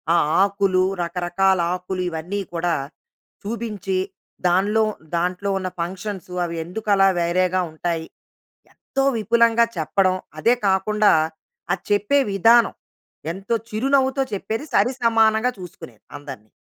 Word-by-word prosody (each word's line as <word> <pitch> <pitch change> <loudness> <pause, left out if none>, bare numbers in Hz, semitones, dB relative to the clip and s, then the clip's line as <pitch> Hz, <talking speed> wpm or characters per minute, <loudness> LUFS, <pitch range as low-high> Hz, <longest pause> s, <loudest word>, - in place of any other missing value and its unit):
ఆ - - +5 0.3
ఆకులు, 195 -2 +2 0.2
రకరకాల 180 +2 +1 0.2
ఆకులు 185 +1 -4
ఇవన్నీ 175 +5 -4
కూడా 170 0 0 0.7
చూపించి, 205 -4 -3 0.5
దానిలో 205 +5 +2 0.3
దాంట్లో 180 +3 -1
ఉన్న 185 -1 -3
ఫంక్షన్స్ 185 +1 -5
అవి 170 -1 -4
ఎందుకు 210 +6 -7
అలా 195 0 +5
వేరేగా 180 +2 +1
ఉంటాయి. 165 0 -3 0.7
ఎంతో 270 0 -3
విపులంగా 230 +1 +3
చెప్పడం 185 +4 +1 0.2
అదే 240 +2 +4
కాకుండా 205 +2 +3 0.6
ఆ - - +4 0.2
చెప్పే 205 +7 +3
విధానం 230 +4 +5 0.6
ఎంతో 195 +6 -3
చిరునవ్వుతో 265 +4 +1
చెప్పేది 220 +6 -3
సరిసమానంగా 230 -2 +3
చూసుకునేది 160 - -11
అందరిని. 135 -7 -10
195 Hz, 110 wpm, -22 LUFS, 175-220 Hz, 0.7 s, ఆ